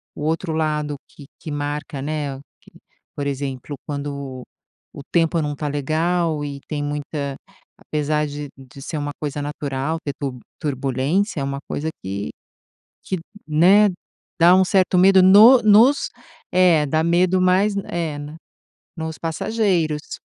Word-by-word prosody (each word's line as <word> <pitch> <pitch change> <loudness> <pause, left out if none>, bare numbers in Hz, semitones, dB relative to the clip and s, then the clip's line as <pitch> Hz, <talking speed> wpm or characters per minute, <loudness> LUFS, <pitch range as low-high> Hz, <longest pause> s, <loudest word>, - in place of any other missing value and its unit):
o - - -8
outro 165 +2 -1
lado 150 -2 -1
que 145 - -14
que 160 - -8
marca, 145 -1 -4
né, 145 -2 -3 0.2
que - - -20 0.4
por 145 - -3
exemplo, 140 0 -4
quando 140 -3 -5 0.5
o - - -6
tempo 165 -1 +2
não 150 -1 -2
está 150 +1 -4
legal 155 +2 0
e 140 -1 -6
tem 150 -2 -3
muita 145 -1 -4 0.4
apesar 150 0 -1
de 145 0 -6
de 135 +1 -13
ser 155 +3 -5
uma 145 0 -3
coisa 145 -1 -3
natural 145 +1 -3
ter 145 - -2
tur 135 -3 -4 0.2
turbulência, 140 - -1
é - - -1
uma 140 0 -3
coisa 155 +2 -2
que 100 +2 -4 0.8
que, 190 - -2 0.3
né, 180 +7 +5 0.5
dá 175 +2 +7
um 190 - +5
certo 185 -1 +2
medo 190 +1 +6
no 215 +7 +8
nos 225 +7 +5 0.4
É, 175 -4 +4
dá 155 +3 +1
medo 180 +2 +3
mais 185 +3 +3 0.2
É, 165 -4 -3
né, 145 +2 -8 0.6
nos 160 -1 -5
passageiros. 165 -3 -1
150 Hz, 145 wpm, -21 LUFS, 145-175 Hz, 0.8 s, no